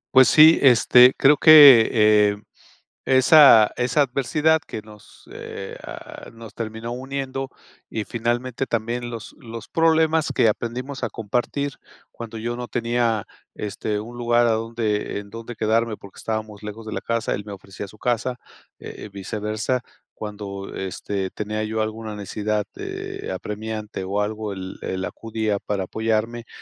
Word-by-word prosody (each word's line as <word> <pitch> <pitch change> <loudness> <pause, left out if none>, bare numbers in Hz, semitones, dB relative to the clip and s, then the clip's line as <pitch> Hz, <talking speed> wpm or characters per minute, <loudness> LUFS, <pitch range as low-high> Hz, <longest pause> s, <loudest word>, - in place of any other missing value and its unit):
Pues 130 0 +8
sí, 155 +1 +7
este, 125 -1 +6
creo 145 +2 +5
que, 145 -7 +9
eh, 105 -2 +4 0.7
esa 130 -4 +7
esa 125 +4 +2
adversidad 150 +4 +1
que 110 - -8
nos, 105 -1 -17
eh, 95 - -8
ah, - - -10
nos 115 -2 -12
terminó 115 +1 -6
uniendo 135 +1 -4 0.4
y, 110 -2 -4
finalmente, 120 +2 -2
también 120 +2 -3
los 115 -2 -8
los 115 -5 -9
problemas 160 -1 +2
que 115 - +4
aprendimos 125 +5 -4
a - - 0
compartir 125 +6 -2 0.4
cuando 115 -1 -9
yo 120 +2 -3
no 125 0 -6
tenía, 115 -2 0 0.3
este, 105 0 -4
un 120 +3 -8
lugar 120 0 +2
a - - +2
donde 110 -2 -2
en 100 0 -13
donde 115 +1 -8
quedarme 110 0 0
porque 100 - -15
estábamos 110 -2 -5
lejos 105 +2 -8
de 110 - -6
la - - -3
casa, 115 -1 -2
él 100 +1 -6
me 105 - -7
ofrecía 100 +1 -9
su 105 - -15
casa, 125 +1 -2 0.4
eh, - - -9
y - - -10
viceversa. 105 +5 -3 0.4
Cuando, 100 -2 -7
este, 95 0 -4
tenía 105 +3 -4
yo 110 0 -2
alguna 110 -1 -5
necesidad, 105 +1 -2
de - - -6
apremiante 105 +2 -5
o 100 +2 -1
algo, 105 -1 -4
él 95 0 -7
él 95 0 -4
acudía 110 -2 -3
para 100 -2 -3
apoyarme, 110 +3 -2
115 Hz, 150 wpm, -22 LUFS, 105-125 Hz, 0.7 s, que